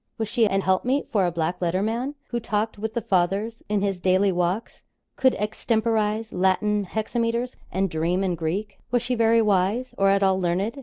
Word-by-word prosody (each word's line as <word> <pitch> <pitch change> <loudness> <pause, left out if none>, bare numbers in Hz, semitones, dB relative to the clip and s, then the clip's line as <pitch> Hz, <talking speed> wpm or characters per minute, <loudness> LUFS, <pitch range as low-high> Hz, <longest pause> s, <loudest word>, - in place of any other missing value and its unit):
Was 220 - -2
she 230 0 +2
an 195 -1 +1
helpmeet 240 +10 0
for 195 -4 +2
a - - -1
black 170 +2 -2
letter 180 +2 0
man, 240 +6 -2
who 240 - -1
talked 215 -1 -2
with 220 +1 -4
the 235 - -1
Fathers 195 +5 0
in 205 -1 +1
his 195 -2 -1
daily 185 +2 +3
walks, 180 +5 -2 0.3
could 260 -1 +3
extemporise 220 0 0
Latin 200 +3 +1
hexameters, 230 +4 -2 0.2
and 190 +2 +1
dream 170 +3 0
in 185 -2 0
Greek. 180 +5 -3
Was 245 0 +1
she 250 - -1
very 230 -1 +4
wise, 210 +5 +1
or 195 0 +4
at 195 0 +3
all 190 -1 +3
learned? 190 +9 -1
205 Hz, 190 wpm, -24 LUFS, 185-225 Hz, 0.3 s, very